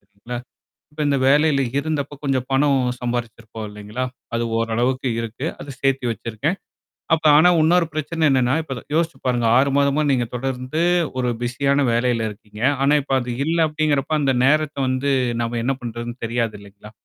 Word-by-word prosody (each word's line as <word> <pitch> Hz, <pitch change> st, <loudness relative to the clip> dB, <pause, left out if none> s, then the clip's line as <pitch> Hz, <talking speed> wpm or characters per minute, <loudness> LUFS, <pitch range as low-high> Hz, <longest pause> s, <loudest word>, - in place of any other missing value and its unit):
சரிங்களா? 100 Hz, +5 st, -8 dB, 0.5 s
இப்ப 150 Hz, -, -16 dB
இந்த 140 Hz, -1 st, +2 dB
வேலையில 145 Hz, -1 st, +4 dB
இருந்தப்ப 145 Hz, -1 st, -3 dB
கொஞ்சம் 130 Hz, -2 st, 0 dB
பணம் 140 Hz, 0 st, +3 dB, 0.2 s
சம்பாதிச்சிருப்போம். 115 Hz, -2 st, -4 dB
இல்லைங்களா? 105 Hz, +4 st, -5 dB, 0.3 s
அது 115 Hz, -, 0 dB, 0.2 s
ஓரளவுக்கு 120 Hz, +3 st, 0 dB
இருக்கு, 115 Hz, +5 st, -5 dB, 0.2 s
அதை -, -, -9 dB
சேர்த்தி 135 Hz, -1 st, +1 dB
வச்சிருக்கேன். 115 Hz, -, -3 dB, 0.6 s
அப்ப 160 Hz, 0 st, -8 dB
ஆனா, 170 Hz, +4 st, +6 dB
இன்னொரு 165 Hz, +2 st, +3 dB
பிரச்சனை, 155 Hz, +2 st, -3 dB
என்னன்னா 130 Hz, 0 st, +2 dB
இப்ப 135 Hz, -6 st, -6 dB
யோசிச்சு 165 Hz, 0 st, 0 dB
பாருங்க 120 Hz, -2 st, +1 dB
6 140 Hz, +1 st, +3 dB
மாதமா 140 Hz, +2 st, +2 dB
நீங்க 125 Hz, -3 st, +1 dB
தொடர்ந்து 130 Hz, +4 st, -3 dB, 0.4 s
ஒரு 125 Hz, -1 st, +1 dB
பிஸியான 140 Hz, +3 st, +1 dB
வேலையில 120 Hz, -1 st, +1 dB
இருக்கீங்க. 105 Hz, 0 st, -13 dB, 0.2 s
ஆனா, 140 Hz, +2 st, +4 dB
இப்ப 135 Hz, -, -3 dB
அது 120 Hz, 0 st, -4 dB
இல்ல 165 Hz, +1 st, 0 dB
அப்படிங்கிறப்ப 150 Hz, -2 st, 0 dB
அந்த 135 Hz, -2 st, +2 dB
நேரத்தை 155 Hz, 0 st, +2 dB
வந்து 130 Hz, +2 st, 0 dB, 0.3 s
நாம 115 Hz, 0 st, -2 dB
என்ன 135 Hz, +3 st, 0 dB
பண்றதுன்னு 120 Hz, +1 st, -6 dB
தெரியாது 115 Hz, -1 st, -1 dB
இல்லைங்களா? 100 Hz, +1 st, -14 dB
130 Hz, 155 wpm, -21 LUFS, 115-145 Hz, 0.6 s, ஆனா